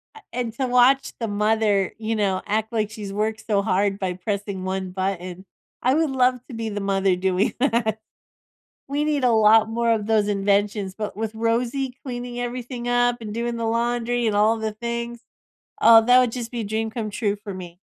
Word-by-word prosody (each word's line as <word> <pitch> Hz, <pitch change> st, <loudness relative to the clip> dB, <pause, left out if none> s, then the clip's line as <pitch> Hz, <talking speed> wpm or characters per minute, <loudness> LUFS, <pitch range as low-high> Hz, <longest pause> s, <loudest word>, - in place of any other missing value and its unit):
a 440 Hz, -, -12 dB
and 235 Hz, -2 st, -3 dB
to 260 Hz, +1 st, -2 dB
watch 250 Hz, +2 st, +4 dB
the 230 Hz, -, -2 dB
mother, 210 Hz, -1 st, +1 dB
you 225 Hz, +1 st, -2 dB
know, 195 Hz, -3 st, 0 dB
act 220 Hz, +2 st, -1 dB
like 215 Hz, -2 st, -1 dB
she's 210 Hz, -3 st, -7 dB
worked 215 Hz, +2 st, -2 dB
so 200 Hz, -3 st, +2 dB
hard 195 Hz, 0 st, +1 dB
by 190 Hz, -3 st, -2 dB
pressing 200 Hz, +1 st, -4 dB
one 190 Hz, 0 st, -3 dB
button. 185 Hz, -1 st, -4 dB, 0.4 s
I 255 Hz, +3 st, +3 dB
would 320 Hz, -3 st, +1 dB
love 255 Hz, -1 st, +3 dB
to 250 Hz, -, -8 dB
be 225 Hz, -1 st, -3 dB
the 205 Hz, -1 st, -4 dB
mother 195 Hz, -1 st, +1 dB
doing 190 Hz, +2 st, 0 dB
that. 230 Hz, -5 st, +1 dB, 0.9 s
We 290 Hz, +2 st, 0 dB
need 295 Hz, -3 st, 0 dB
a 250 Hz, -, +4 dB
lot 220 Hz, 0 st, +5 dB
more 230 Hz, +1 st, 0 dB
of 215 Hz, -2 st, -1 dB
those 215 Hz, -2 st, +2 dB
inventions, 200 Hz, 0 st, 0 dB
but 210 Hz, -1 st, -5 dB
with 220 Hz, 0 st, -3 dB
Rosey 240 Hz, +4 st, -1 dB
cleaning 245 Hz, -1 st, -5 dB
everything 245 Hz, 0 st, -5 dB
up 245 Hz, 0 st, +2 dB
and 215 Hz, -2 st, -6 dB
doing 235 Hz, +1 st, -2 dB
the 230 Hz, -, -2 dB
laundry 240 Hz, +1 st, 0 dB
and 210 Hz, -, +1 dB
all 215 Hz, +2 st, +4 dB
the 220 Hz, -1 st, -2 dB
things, 235 Hz, +1 st, -4 dB, 0.6 s
oh, 225 Hz, 0 st, +8 dB
that 245 Hz, +1 st, +6 dB
would 245 Hz, -2 st, +1 dB
just 235 Hz, -2 st, -5 dB
be 240 Hz, -, -4 dB
a -, -, -3 dB
dream 220 Hz, +2 st, -2 dB
come 220 Hz, -2 st, -4 dB
true 205 Hz, -1 st, -1 dB
for 205 Hz, -2 st, -8 dB
me. 180 Hz, -1 st, -9 dB
220 Hz, 200 wpm, -23 LUFS, 205-240 Hz, 0.9 s, oh